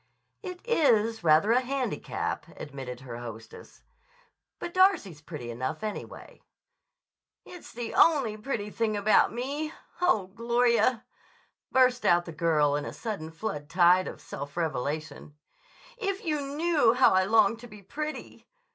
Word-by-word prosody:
"It 365 Hz, -3 st, -7 dB
is 230 Hz, -, +2 dB
rather 160 Hz, +6 st, +4 dB
a 250 Hz, +2 st, +4 dB
handicap," 265 Hz, 0 st, -3 dB
admitted 135 Hz, -4 st, -7 dB
her 120 Hz, -3 st, -8 dB
hostess. 115 Hz, -2 st, -11 dB, 0.7 s
"But 345 Hz, -, -6 dB
Darcy's 365 Hz, -, +3 dB
pretty 150 Hz, -7 st, -7 dB
enough, 130 Hz, -, -4 dB
anyway." 215 Hz, -1 st, -7 dB, 1.0 s
"It's 355 Hz, -2 st, -12 dB
the 235 Hz, 0 st, -6 dB
only 275 Hz, -10 st, +4 dB
pretty 210 Hz, -2 st, -4 dB
thing 220 Hz, -2 st, -1 dB
about 205 Hz, +1 st, +4 dB
me. 285 Hz, +6 st, -3 dB, 0.3 s
Oh, 220 Hz, -, +3 dB
Gloria," 235 Hz, +1 st, +2 dB, 0.7 s
burst 255 Hz, -1 st, +3 dB
out 175 Hz, 0 st, +3 dB
the 170 Hz, -, -7 dB
girl 155 Hz, -3 st, +2 dB
in 145 Hz, -, -2 dB
a -, -, -6 dB
sudden 210 Hz, -9 st, -5 dB
flood 160 Hz, -4 st, -5 dB
tide 180 Hz, +1 st, +4 dB
of -, -, -7 dB
self 145 Hz, +3 st, -8 dB
revelation, 155 Hz, -1 st, -3 dB, 0.6 s
"if 395 Hz, -2 st, -3 dB
you 305 Hz, -3 st, 0 dB
knew 290 Hz, -3 st, +2 dB
how 255 Hz, -5 st, +5 dB
I 185 Hz, 0 st, +3 dB
long 220 Hz, +1 st, +4 dB
to 240 Hz, +1 st, -11 dB
be 210 Hz, -3 st, -14 dB
pretty! 305 Hz, +10 st, -7 dB
215 Hz, 140 wpm, -28 LUFS, 160-260 Hz, 1.0 s, how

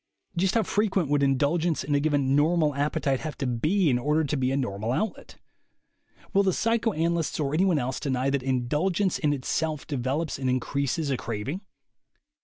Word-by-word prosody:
Just 185 Hz, +4 st, +1 dB
how 225 Hz, -, +3 dB
frequent 195 Hz, -6 st, 0 dB
would 145 Hz, -1 st, +2 dB
indulgence 145 Hz, +5 st, +1 dB
in 145 Hz, -, -2 dB
a 145 Hz, -, +3 dB
given 140 Hz, -2 st, +1 dB
"normal" 155 Hz, 0 st, +3 dB
appetite 140 Hz, -1 st, 0 dB
have 155 Hz, -2 st, -6 dB
to 135 Hz, -, -2 dB
be 155 Hz, -, +1 dB
in 125 Hz, -4 st, +3 dB
order 150 Hz, +5 st, +1 dB
to 150 Hz, 0 st, -1 dB
be 130 Hz, -2 st, 0 dB
a 135 Hz, -, 0 dB
"normal 110 Hz, -4 st, -2 dB
outlet?" 215 Hz, -, -3 dB, 1.0 s
Will 200 Hz, -, +5 dB
the 190 Hz, -2 st, +2 dB
psychoanalysts, 170 Hz, -10 st, 0 dB
or 145 Hz, -1 st, -1 dB
any 175 Hz, +5 st, +3 dB
one 180 Hz, -5 st, +3 dB
else, 130 Hz, -1 st, -2 dB
deny 135 Hz, -1 st, 0 dB
that 140 Hz, -1 st, 0 dB
indulgence 150 Hz, +10 st, 0 dB
in 150 Hz, -, +1 dB
itself 150 Hz, +2 st, -2 dB
develops 140 Hz, +3 st, -2 dB
and 130 Hz, -1 st, -1 dB
increases 140 Hz, +3 st, -1 dB
a 130 Hz, -, 0 dB
craving? 120 Hz, -, -4 dB
145 Hz, 180 wpm, -26 LUFS, 135-170 Hz, 1.0 s, Will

